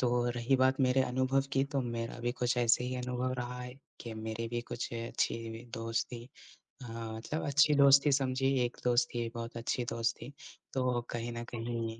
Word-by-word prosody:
तो 120 -1 +2
रही 120 +3 +2
बात 130 +1 +3
मेरे 130 0 +4
अनुभव 130 +2 +1
की 135 0 +3
तो 135 - +3
मेरा 115 -2 -3
अभी 120 0 -2
कुछ 125 0 0
ऐसे 120 +1 +3
ही 125 - -2
अनुभव 125 0 -2
रहा 125 0 -4
है 125 0 -7 0.3
कि 115 -2 -6
मेरे 110 +1 -4
भी 120 0 -2
कुछ 120 - -4
अच्छी 115 0 -2
दोस्ती 115 +1 -3 0.5
अ, - - -7
मतलब 115 +6 -4
अच्छी 150 +1 +5
दोस्ती 140 +1 +7
समझिए 135 -1 +2
एक 120 - -5
दोस्त 120 0 +3
थी 120 -1 -1
बहुत 115 0 -5
अच्छी 120 +1 -1
दोस्त 115 0 0
थी, 140 - -8 0.4
तो 125 -2 +1
कहीं 120 0 -3
न 120 - -3
कहीं 115 -1 -3
120 Hz, 185 wpm, -32 LUFS, 115-130 Hz, 0.5 s, दोस्ती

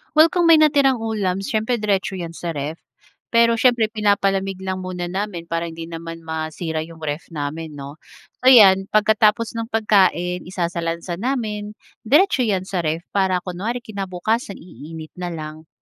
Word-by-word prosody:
Well, 315 +2 +6
kung 350 -2 +2
may 330 - +8
natirang 285 -4 +4
ulam, 195 -4 -1
siyempre 220 0 0
diretso 205 -3 -1
yan 170 -3 -5
sa 170 -1 -5
ref. 150 +3 -4 0.6
Pero, 230 0 +4
siyempre 240 -3 +3
pinapalamig 195 -2 +1
lang 190 0 -3
muna 180 -1 -5
namin 190 -3 -3
para 165 0 -3
hindi 165 0 -8
naman 165 0 -7
masira 160 0 -4
yung 165 -1 -13
ref 150 +1 -4
namin 150 +1 -5
'no. 140 +2 -9 0.4
So 255 - -1
'yan 195 -6 +7
pagkatapos 215 +1 +3
ng 225 - -4
pagkain, 190 -6 +1
isasalansan 170 -1 -3
namin, 215 -4 -3 0.3
diretso 290 - +4
yan 190 -3 0
sa 190 -1 -3
ref. 165 0 -2
Para, 190 -2 +1
kunwari 210 +7 -4
kinabukasan 200 0 -3
iinit 160 -2 -10
na 180 - -3
lang, 155 0 -8
190 Hz, 155 wpm, -21 LUFS, 165-220 Hz, 0.6 s, may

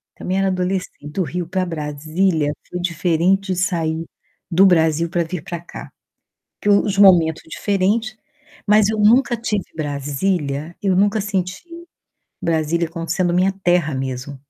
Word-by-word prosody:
também 185 +1 -3
era 195 - +2
adolescente, 185 -4 -3
do 185 +5 -1
Rio 175 0 -4
pra 185 +1 -1
Brasília, 155 0 -1 0.2
foi 180 - -4
diferente 180 +2 +1
de - - -3
sair 165 -3 -1 0.5
do 185 +4 +5
Brasil 165 -2 +2
pra 175 -1 0
vir 165 -1 -6
pra 170 -1 -5
cá, 170 - -10 0.7
porque 205 - -1
os 200 -1 +3
momentos 175 -5 +5
diferentes, 205 +5 -1 0.5
mas 210 0 +5
eu 220 -1 -2
nunca 240 +3 +4
tive 210 -4 -2
Brasília, 145 +1 -2
eu 195 -2 +2
nunca 205 +2 +2
senti 185 -3 -3 0.8
Brasília 165 +1 0
como 165 0 -6
sendo 175 +1 +1
minha 185 +2 +2
terra 175 -4 +2
mesmo. 130 +1 -5
175 Hz, 145 wpm, -20 LUFS, 160-195 Hz, 0.8 s, do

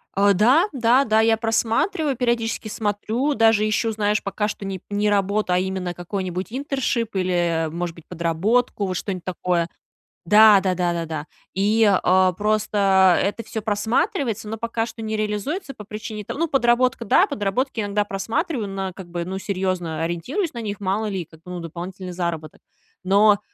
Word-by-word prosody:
А. 200 +1 +4
Да, 250 - +4
да, 255 +1 +3
да, 220 -1 +3
я 225 0 +3
просматриваю, 240 - 0
периодически 235 -2 -1
смотрю, 220 +6 -1
даже 225 -3 +4
ищу, 225 +1 0
знаешь, 210 0 0
пока 200 +1 -2
что 205 - -6
не 190 -2 -5
не 205 +1 +1
работу, 200 -1 +1
а - - +3
именно 185 -1 -3
какой-нибудь 185 +1 -4
интершип 255 -4 -2
или, 185 -1 0 0.3
э, - - -3
может 170 +1 -4
быть, 165 - -15
подработку, 185 +7 0
вот 185 - -3
что-нибудь 185 -2 -4
такое. 175 -1 -1 0.6
Да, 210 +2 +7
да-да-да. 170 -4 -1 0.3
И, 210 +4 +3
а, 185 -1 +3
просто 200 -2 +3
это 205 +3 -1
всё 220 -1 -5
просматривается, 225 - 0
но 220 +1 -4
пока 230 0 -2
что 230 - -9
не 220 0 -2
реализуется 215 - -3
по 210 - -10
причине 215 0 -6
то - - -6
Ну, 335 +3 0
подработка, 250 -3 +2
да, - - +5
подработки 225 +5 -2
иногда 205 0 0
просматриваю, 225 - -2
на, 195 -1 -4
как 185 -1 -10
бы 170 0 -4
Ну, 190 +2 -4
серьезно 185 -5 -2
ориентируюсь 210 - -2
на 235 - -5
них: 205 -2 -4
мало 200 +2 -1
ли, 190 -4 -3
как 160 0 -19
бы, 180 +1 -11
ну, 180 - -5
дополнительный 180 +3 -7
заработок. 170 -3 -4 0.4
Но, 200 +2 +5
205 Hz, 170 wpm, -22 LUFS, 185-225 Hz, 0.6 s, Да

